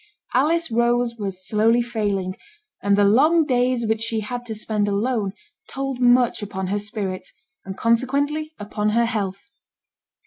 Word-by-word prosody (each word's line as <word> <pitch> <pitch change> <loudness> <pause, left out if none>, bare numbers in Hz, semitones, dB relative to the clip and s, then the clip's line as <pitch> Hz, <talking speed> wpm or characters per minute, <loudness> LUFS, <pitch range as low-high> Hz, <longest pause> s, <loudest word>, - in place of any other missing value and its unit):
Alice 320 +4 +2
Rose 235 0 +1
was 190 -3 -5
slowly 225 +3 +3
failing, 205 -5 -2 0.5
and 200 0 +2
the 205 - +4
long 300 +11 +4
days 250 -2 +1
which 220 0 0
she 225 -1 -1
had 245 +3 -5
to 220 - -4
spend 210 -1 -1
alone 205 -1 0 0.4
told 270 -1 -4
much 245 -1 +4
upon 190 -2 -4
her 205 +1 0
spirits, 205 -3 -5 0.3
and 190 0 -7
consequently 280 +6 0
upon 210 0 -2
her 235 - +4
health. 210 +5 -4
225 Hz, 145 wpm, -22 LUFS, 205-245 Hz, 0.5 s, the